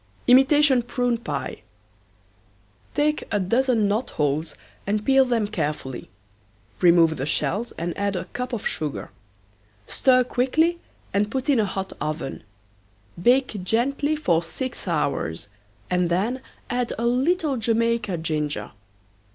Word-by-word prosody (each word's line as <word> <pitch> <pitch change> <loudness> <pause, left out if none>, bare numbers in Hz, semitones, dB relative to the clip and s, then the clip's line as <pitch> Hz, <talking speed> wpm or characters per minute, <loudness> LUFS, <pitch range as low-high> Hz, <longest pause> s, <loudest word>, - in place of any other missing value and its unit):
IMITATION 265 +1 +6
PRUNE 245 0 -1
PIE. 145 -11 -4 1.3
Take 300 +1 +1
a 205 - +1
dozen 230 +3 +2
knot 215 +5 0
holes 150 +2 -1 0.3
and 210 +1 0
peel 270 0 +5
them 235 -4 +1
carefully. 145 - -4 0.7
Remove 170 -3 +5
the 135 +2 -3
shells 220 +9 -1
and 170 +1 -4
add 200 -1 -1
a 180 -1 -3
cup 250 +6 -5
of 235 -4 -4
sugar. 150 -3 -3 0.7
Stir 255 - +3
quickly 315 +8 +1 0.3
and 205 +1 +1
put 265 +4 -3
in 270 -5 +4
a 215 - +3
hot 190 -1 -4
oven. 155 -1 -3 0.8
Bake 245 -3 +2
gently 275 +9 +1
for 175 - +2
six 245 +8 -5
hours 140 - -1 0.4
and 180 -1 +1
then 215 +9 0 0.3
add 245 -1 -1
a 235 - -1
little 275 +5 +2
Jamaica 230 -3 0
ginger. 155 -2 -2
225 Hz, 125 wpm, -24 LUFS, 170-255 Hz, 1.3 s, IMITATION